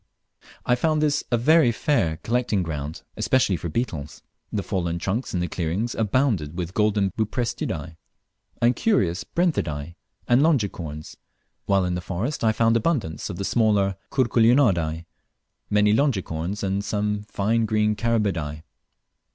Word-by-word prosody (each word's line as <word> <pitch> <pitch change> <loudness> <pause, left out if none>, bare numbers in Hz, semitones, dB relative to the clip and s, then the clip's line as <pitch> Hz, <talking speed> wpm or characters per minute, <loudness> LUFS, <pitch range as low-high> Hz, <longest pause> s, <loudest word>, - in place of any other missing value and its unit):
I 125 - +3
found 155 +5 +1
this 150 -1 +1
a 120 - +3
very 150 +1 +5
fair 100 - 0
collecting 115 -5 0
ground, 75 -2 -5
especially 125 -7 +2
for 85 +1 -4
beetles. 80 - -4 0.3
The 100 - -2
fallen 85 -4 -2
trunks 100 +8 -2
in 90 - 0
the 90 - -1
clearings 95 +9 -2
abounded 105 - 0
with 90 0 -4
golden 105 -2 +2
Buprestidae 110 -6 -3 0.6
and 120 +1 +3
curious 95 - +1
Brenthidae, 85 - -1 0.3
and 120 +2 +4
longicorns, 95 - -1 0.5
while 95 -2 +3
in 90 - -1
the 90 - -2
forest 100 - -3
I 110 - +4
found 115 +1 +2
abundance 115 - -1
of 95 - -5
the 100 - -3
smaller 105 -4 +2
Curculionidae, 115 - +2 0.6
many 105 0 +3
longicorns, 100 - -1
and 100 +1 -1
some 105 +1 -1
fine 110 +2 0
green 105 0 +1
Carabidae. 95 -10 -1
105 Hz, 135 wpm, -24 LUFS, 85-120 Hz, 0.6 s, very